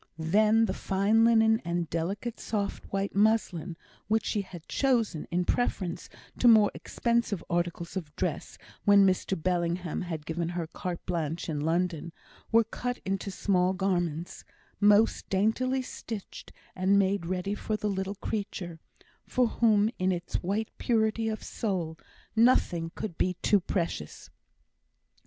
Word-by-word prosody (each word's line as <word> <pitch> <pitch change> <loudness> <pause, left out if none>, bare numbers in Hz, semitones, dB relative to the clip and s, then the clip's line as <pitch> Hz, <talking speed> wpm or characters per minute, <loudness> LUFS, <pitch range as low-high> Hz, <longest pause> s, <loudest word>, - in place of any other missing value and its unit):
Then 215 +7 +3
the 205 - -2
fine 200 +4 +2
linen 220 -1 +4
and 170 0 -1
delicate 195 +9 -3
soft 205 -2 -3
white 195 0 -2
muslin, 195 -5 +1 0.3
which 220 +2 +1
she 210 - 0
had 175 -4 -11
chosen 230 - +1
in 180 +1 0
preference 185 -7 -1 0.3
to 245 - +4
more 220 -3 +7
expensive 235 -5 -1
articles 175 0 -2
of 160 -6 -5
dress - - -3 0.3
when 200 -1 +6
Mr 190 -1 +1
Bellingham 175 0 -1
had 165 -4 -5
given 165 +1 -2
her 175 -1 -3
carte 175 +2 -6
blanche 165 -2 -2
in 150 -2 -2
London, 170 0 -1 0.4
were 230 0 +6
cut 245 +2 -4
into 195 +1 -2
small 185 -1 +1
garments, 175 -4 -2 0.4
most 210 +2 +4
daintily 255 +7 +1
stitched 225 -4 -8 0.2
and 190 +2 +3
made 195 -3 +1
ready 185 +2 -2
for 215 +1 -2
the 210 - -2
little 195 0 -2
creature, 195 -5 -4 0.5
for 250 - +2
whom 215 -2 +3
in 185 0 +2
its 175 -1 -2
white 205 +5 -2
purity 225 -1 +1
of 220 - -4
soul 180 -7 -3 0.4
nothing 180 -8 +3
could 185 -6 -5
be 180 0 +1
too 205 - +4
precious. 170 - -4
195 Hz, 140 wpm, -29 LUFS, 175-220 Hz, 0.5 s, more